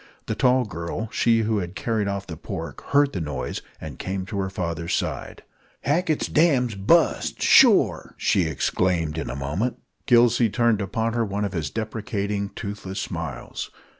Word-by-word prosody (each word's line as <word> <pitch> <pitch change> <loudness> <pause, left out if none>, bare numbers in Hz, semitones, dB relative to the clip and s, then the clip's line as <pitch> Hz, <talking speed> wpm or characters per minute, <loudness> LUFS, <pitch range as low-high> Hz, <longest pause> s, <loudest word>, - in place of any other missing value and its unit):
The - - -2
tall 125 0 +3
girl, 85 +4 -5
she 115 -1 +3
who 110 -1 +1
had 90 0 -5
carried 110 +2 -1
off 100 0 -3
the 80 - -7
pork, - - -6
heard 140 0 +3
the 90 - -2
noise, 75 -5 -4 0.2
and - - -8
came 95 0 -3
to 100 0 -4
her 95 -1 -1
father's 85 -3 -2
side. - - -4 0.4
"Hackett's 155 +3 +1
dam's 135 -7 +3
bust, 105 - +2
shore!" - - +5
she 95 - +2
exclaimed 80 +1 0
in - - -4
a - - -4
moment. 75 - -2 0.3
Gillsey 120 -1 +5
turned 115 -1 +2
upon 110 +4 -1
her 120 -1 +1
one 105 -1 -2
of 100 - -4
his 80 -6 -2
deprecating, 105 -1 -3
toothless 100 -3 -5
smiles. - - -5
100 Hz, 165 wpm, -24 LUFS, 90-115 Hz, 0.4 s, shore